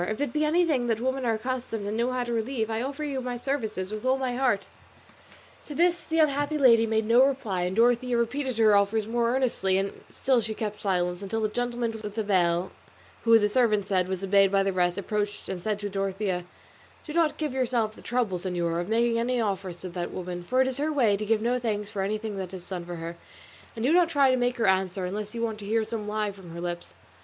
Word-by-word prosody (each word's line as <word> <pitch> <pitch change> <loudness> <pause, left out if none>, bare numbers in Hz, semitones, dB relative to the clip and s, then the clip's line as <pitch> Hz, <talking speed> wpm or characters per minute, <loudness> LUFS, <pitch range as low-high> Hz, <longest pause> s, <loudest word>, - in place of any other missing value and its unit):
If 215 - -3
it 285 -4 -1
be 305 - +1
anything 305 -5 +2
that 225 -2 0
women 260 +1 -1
are 225 - +2
accustomed 240 -2 -3
and 205 +1 -2
know 235 +2 +1
how 255 -1 -1
to 240 -1 -3
relieve, 225 -1 -1
I 220 +1 -1
offer 280 +4 -4
you 275 -3 -2
my 250 -1 -4
services 220 -8 -3
with 215 0 -5
all 260 +1 +2
my 260 -2 -2
heart." 245 -6 +1 1.0
To 295 - -8
this 345 +2 +2
the 325 - -1
unhappy 290 -1 +2
lady 230 -5 +5
made 220 0 +1
no 235 +3 +6
reply; 220 -10 0
and 180 +1 -2
though - - +6
Dorothea 245 +1 +3
repeated 255 +1 -1
her 215 -2 +5
offers 205 +2 +2
more 235 +1 +1
earnestly 215 -8 +1
she 195 +1 0 0.2
still 255 -2 +1
kept 215 -1 -4
silence, 180 -2 0
until 220 +3 -3
the 215 - +1
gentleman 240 +1 -2
with 210 -1 -6
the 220 - -1
veil, 180 -3 +1 0.5
who, 230 0 +7
the 210 -2 +3
servant 210 -3 +2
said, 185 -2 +1
was 190 0 -3
obeyed 195 0 +4
by 195 -1 +3
the 195 0 0
rest, 175 0 +1
approached 205 +1 -3
and 185 -2 -4
said 210 +2 -1
to 205 - -2
Dorothea, 195 -2 -2 0.6
"Do 300 - -6
not 330 -2 +2
give 300 -4 -2
yourself 240 -4 0
the - - -13
trouble, 230 -7 -1
señora, 175 -2 -1
of 175 - -6
making 230 +1 +2
any 245 +1 0
offers 195 -5 -2
to 185 - -5
that 175 0 -4
woman, 180 -1 -5
for 255 +8 +2
it - - -2
is 260 0 -3
her 305 +2 0
way 240 -9 +3
to 215 +2 -3
give 220 0 +2
no 245 +2 +1
thanks 210 -3 -2
for 195 - -3
anything 210 +1 -2
that 190 -1 -5
is 180 - -10
done 180 -3 -5
for 175 - -5
her; 170 +1 -6 0.6
and 225 +1 -2
do 290 - +3
not 350 -1 +5
try 280 -5 +4
to - - +3
make 245 0 0
her 230 - +1
answer 190 -1 +1
unless 210 +4 -5
you 230 - -2
want 220 -2 -2
to 205 - -8
hear 225 +1 +2
some 215 -1 -5
lie 210 0 -1
from 190 -3 -13
her - - -6
lips." 175 0 -5
220 Hz, 240 wpm, -27 LUFS, 195-250 Hz, 1.0 s, who